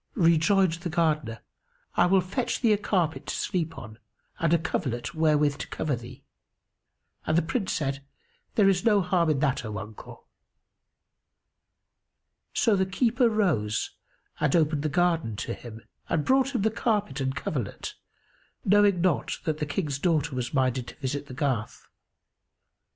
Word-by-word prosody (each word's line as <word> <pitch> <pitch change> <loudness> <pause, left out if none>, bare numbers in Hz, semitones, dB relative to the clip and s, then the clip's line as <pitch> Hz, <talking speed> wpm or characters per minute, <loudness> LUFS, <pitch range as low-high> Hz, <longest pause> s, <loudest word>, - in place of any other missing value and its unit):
Rejoined 170 +1 +4
the 175 - -3
Gardener, 155 -8 0 0.5
"I - - +4
will 190 +1 +4
fetch 215 +8 -2
thee 230 -4 +4
a - - +2
carpet 175 -6 -1
to - - -2
sleep 165 -3 -2
on 110 0 -10 0.4
and 165 -1 +1
a 170 - +5
coverlet 135 -7 -3
wherewith 150 -3 +2
to - - -5
cover 150 -4 -2
thee;" 120 0 -11 1.0
and 155 - +2
the 170 - +3
Prince 190 +4 -2
said, 140 -2 -2 0.5
"There 205 -3 +5
is 185 -2 +2
no 210 -3 +4
harm 180 -2 +2
in 150 - +2
that, 135 -2 +1
O 110 -2 -5
uncle." 110 0 -10 2.3
So 220 - +3
the 190 -1 +1
keeper 235 +5 +2
rose 155 - 0 0.5
and 150 0 +2
opened 155 -3 +2
the 155 - -1
garden 165 - +1
to - - -4
him, 115 -1 -10 0.3
and 155 -3 0
brought 265 +1 +2
him 215 - +1
the 220 - +2
carpet 210 - -1
and 130 0 -1
coverlet, 135 -5 -4 0.7
knowing 200 -2 +4
not 180 -3 +1
that 155 -1 -2
the 150 - -2
King's 145 -3 -2
daughter 150 -3 +1
was 125 -1 -3
minded 130 -2 0
to - - -9
visit 145 +1 -3
the 130 - -9
garth. 130 -7 -2
160 Hz, 155 wpm, -27 LUFS, 135-190 Hz, 2.3 s, a